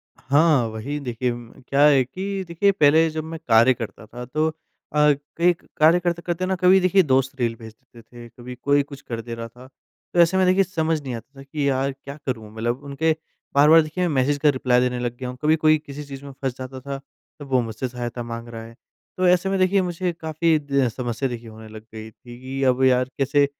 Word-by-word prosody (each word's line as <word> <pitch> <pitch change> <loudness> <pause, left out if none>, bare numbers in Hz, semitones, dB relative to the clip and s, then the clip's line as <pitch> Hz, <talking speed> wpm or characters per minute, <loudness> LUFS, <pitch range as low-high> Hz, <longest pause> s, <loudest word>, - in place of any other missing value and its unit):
हाँ। 145 -3 +3
वही 125 +7 -5
देखिए 125 -2 -2
उम, 120 -1 -8 0.2
क्या 140 +1 +1
है 140 -3 +5
कि 190 +9 -5
देखिए 170 +4 +2
पहले 160 -2 +4
जब 155 0 -4
मैं 160 0 -7
कार्य 115 +2 +6
करता 115 -1 -8
था 125 +2 -9
तो 155 +6 0 0.5
अ, 150 0 +5 0.3
कई 175 +1 +4
एक 175 - -1 0.2
कार्य 160 +3 +5
करते-करते 175 0 -2
ना 190 0 0
कभी 185 +1 +5
देखिए 185 +1 +4
दोस्त 135 -2 +2
रील 115 -2 0
भेज 110 -1 -12
देते 115 +1 -19
थे, 120 +1 -13
कभी 120 +2 -10
कोई 145 +2 +2
कुछ 140 0 -12
कर 115 -3 -5
दे 115 +1 -7
रहा 115 0 -6
था। 125 +3 -15 0.5
तो 175 - +1
ऐसे 175 +2 +5
में 185 - +4
देखिए 185 +2 +4
समझ 165 -3 -1
नहीं 135 -3 -5
आता 135 +4 -12
था 135 - -10
कि 140 +1 -3
यार 135 +1 0
क्या 135 +1 -10
करूँ? 115 -5 -4
मतलब 120 +4 -2
उनके 145 +3 0 0.4
बार-बार 155 +3 +7
देखिए 170 +4 -2
मैं 160 - -2
मैसेज 135 +2 +2
का 150 - +6
रिप्लाई 125 -2 +2
देने 125 -1 0
लग 120 -1 -3
गया 130 -1 -5
हूँ। 125 - -8
कभी 155 +1 +4
कोई 155 0 +6
किसी 150 -1 -9
चीज़ 140 -1 -9
में 140 - -8
फँस 130 -2 -2
जाता 130 0 -7
था, 140 +1 -6 0.4
तो 145 - -8
वो 130 -2 +2
मुझसे 115 +3 -4
सहायता 120 -1 -5
माँग 115 0 -7
रहा 115 -1 -7
है। 115 +1 -13 0.4
तो 185 - +2
ऐसे 180 +2 +3
में 195 - 0
देखिए 185 +1 +3
मुझे 180 0 -2
काफ़ी 160 0 +1
ज 140 -2 +3
समस्या 125 +1 -2
देखिए 120 -2 -7
होने 110 0 -12
लग 110 0 -11
गई 110 0 -8
थी 120 +1 -14
कि 135 +1 -4
अब 130 +1 -1
यार 130 -1 +3
कैसे 140 +1 +3
135 Hz, 230 wpm, -23 LUFS, 120-160 Hz, 0.5 s, बार-बार